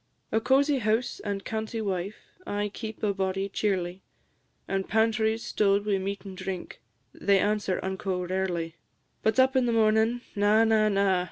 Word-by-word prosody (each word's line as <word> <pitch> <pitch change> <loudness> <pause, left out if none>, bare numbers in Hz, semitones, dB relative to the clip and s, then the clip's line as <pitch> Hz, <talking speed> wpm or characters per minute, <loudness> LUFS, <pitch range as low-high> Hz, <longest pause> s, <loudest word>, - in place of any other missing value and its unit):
A 220 - +2
cosie 275 +3 +3
house 220 +2 0
and 200 -2 -4
canty 220 +1 -3
wife 195 -1 -2 0.3
Aye 205 0 -2
keep 220 -1 -7
a 205 -1 +2
body 195 0 -1
cheerly; 190 -3 -1 0.7
And 195 0 -2
pantries 220 0 +2
stowed 200 0 +2
wi' 200 -2 +1
meat 200 +2 -4
and 190 -1 -7
drink, 185 -1 -6 0.3
They 200 -1 +3
answer 205 -1 +1
unco 190 -1 -2
rarely. 175 -3 -2 0.4
But 220 +2 +2
up 260 +1 +4
in 255 -2 +3
the - - +2
mornin' 225 +1 +3
na, 210 +2 +4
na, 220 -1 +3
na! 195 -2 +2
205 Hz, 160 wpm, -27 LUFS, 190-220 Hz, 0.7 s, up